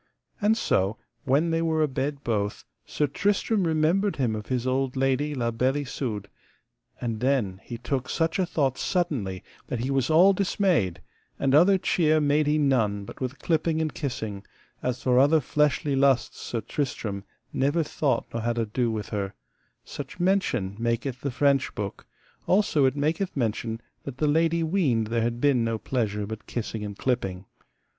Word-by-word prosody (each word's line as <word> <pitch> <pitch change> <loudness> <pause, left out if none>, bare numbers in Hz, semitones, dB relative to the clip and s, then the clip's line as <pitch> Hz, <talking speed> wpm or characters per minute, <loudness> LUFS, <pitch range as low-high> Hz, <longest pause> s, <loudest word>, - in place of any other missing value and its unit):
And 215 +2 +3
so 95 - +1 0.3
when 145 +6 +2
they 165 0 +1
were 160 -1 +2
abed 140 0 -2
both 105 -3 -2 0.2
Sir 150 - 0
Tristram 200 - +1
remembered 165 +6 +2
him 120 -5 0
of 105 -1 -6
his 125 -2 -1
old 130 0 0
lady 135 +3 +1
La 120 -3 0
Beale 130 +4 +1
Isoud. 110 -7 -4 0.7
And 115 -3 -3
then 120 -8 0
he 120 - -6
took 125 +2 -3
such 165 +2 0
a 185 - +3
thought 140 -7 0
suddenly 135 - -1 0.2
that 120 - -3
he 130 +3 -1
was 135 -2 +1
all 175 +5 +6
dismayed, 180 - +1 0.4
and 135 -1 +1
other 180 +6 +6
cheer 155 -4 +2
made 150 0 +2
he 150 +1 +3
none 115 -9 +1
but - - -11
with 130 +1 -3
clipping 160 -1 0
and 160 -1 -1
kissing; 110 -8 -4 0.4
as 125 0 -2
for 125 -1 +4
other 145 +4 +5
fleshly 150 0 +1
lusts 135 -2 +2
Sir 115 - -3
Tristram 110 -5 -3 0.3
never 145 +5 +1
thought 145 -2 0
nor 115 - -2
had 120 +1 -1
ado 115 +2 0
with 110 -2 -4
her: 100 -2 -3 0.5
such - - -8
mention 175 - +1
maketh 120 +2 -1
the 140 - -1
French 140 +1 +1
book; 100 -2 -5 0.4
also 185 -7 +3
it 130 - +2
maketh 155 +5 -1
mention 115 -1 -1 0.3
that 135 -2 -6
the 155 - +1
lady 165 +2 +2
weened 145 - +1
there 115 0 +1
had 120 +1 -1
been 135 -3 +3
no 115 0 0
pleasure 105 -4 -2
but 110 0 -8
kissing 110 -2 -4
and 100 -1 -6
clipping. 95 -7 -1
135 Hz, 170 wpm, -26 LUFS, 115-155 Hz, 0.7 s, all